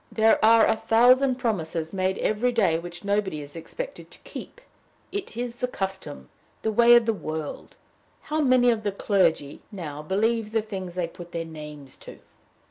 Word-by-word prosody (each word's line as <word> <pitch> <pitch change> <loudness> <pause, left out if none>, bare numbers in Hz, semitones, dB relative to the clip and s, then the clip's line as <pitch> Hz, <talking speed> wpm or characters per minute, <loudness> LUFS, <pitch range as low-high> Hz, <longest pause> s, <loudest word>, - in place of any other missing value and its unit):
"There 220 0 +3
are 225 0 +7
a - - +3
thousand 250 +4 +4
promises 170 -10 -2
made 190 0 0
every 220 +4 +1
day 195 -9 +2
which 175 +1 -9
nobody 200 -5 0
is 145 +1 -9
expected - - -7
to - - -15
keep. - - -9 0.5
It 390 - -5
is 240 0 -4
the 250 - -1
custom, 190 - -5 0.4
the 220 - +1
way 235 +2 +7
of 235 -1 +5
the 225 - +2
world! 155 -6 -6 0.5
How 310 +1 -2
many 255 -3 +4
of 225 -2 -1
the 205 -1 -1
clergy, 175 -8 +1
now, 155 -7 -6
believe 215 +6 0
the 220 -1 +1
things 190 -5 -6
they 180 -2 0
put 175 +1 -12
their 165 0 -3
names 150 -3 -10
to?" - - -12
205 Hz, 175 wpm, -25 LUFS, 170-235 Hz, 0.5 s, are